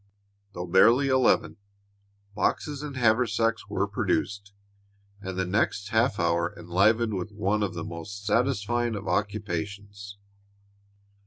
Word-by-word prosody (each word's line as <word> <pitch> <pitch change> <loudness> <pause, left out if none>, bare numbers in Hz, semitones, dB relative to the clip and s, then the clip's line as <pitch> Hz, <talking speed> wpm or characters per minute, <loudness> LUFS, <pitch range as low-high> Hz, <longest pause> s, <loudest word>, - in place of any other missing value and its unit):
Though 90 -1 -5
barely 115 +10 +5
eleven, 130 -4 +2 0.8
boxes 145 +7 -1
and 145 -3 -6
haversacks 115 -2 +1
were 100 -1 0
produced 100 -1 -2 0.7
and 95 -2 -6
the 95 - 0
next 100 +1 0
half 110 -1 +1
hour 85 0 0
enlivened 100 +7 +2
with 95 +2 -4
one 105 0 -1
of 95 -4 -2
the 80 - -4
most 100 +5 -8
satisfying 120 0 0
of 100 -1 -6
occupations. 100 +1 -4
100 Hz, 115 wpm, -26 LUFS, 95-115 Hz, 0.8 s, barely